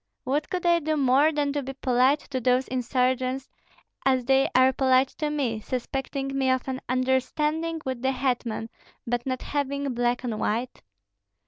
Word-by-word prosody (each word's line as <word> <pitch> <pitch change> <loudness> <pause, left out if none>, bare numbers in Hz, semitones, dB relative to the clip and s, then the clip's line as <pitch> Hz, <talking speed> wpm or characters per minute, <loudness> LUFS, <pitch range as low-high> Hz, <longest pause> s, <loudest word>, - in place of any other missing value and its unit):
What 290 +3 -1
could 360 -1 -3
I 340 0 +4
do 310 -1 -1
more 275 +3 +4
than 290 -2 0
to 290 - -1
be 270 0 -6
polite 260 +2 +2
to 260 -2 -1
those 250 +2 +2
insurgents, 255 +1 0 0.6
as 260 -2 +2
they 270 +1 +3
are 260 +1 +5
polite 260 0 +3
to 305 -1 0
me, 265 -7 -1
suspecting 270 +3 -3
me 265 -1 +1
of 260 0 0
an 260 0 -3
understanding 300 +6 0
with 260 -2 -3
the 265 +1 +1
hetman, 245 -4 -2 0.3
but 240 +1 -2
not 255 -1 -2
having 280 -1 -2
black 245 +1 0
on 220 -3 -3
white?" 235 +5 -2
260 Hz, 165 wpm, -26 LUFS, 255-280 Hz, 0.6 s, are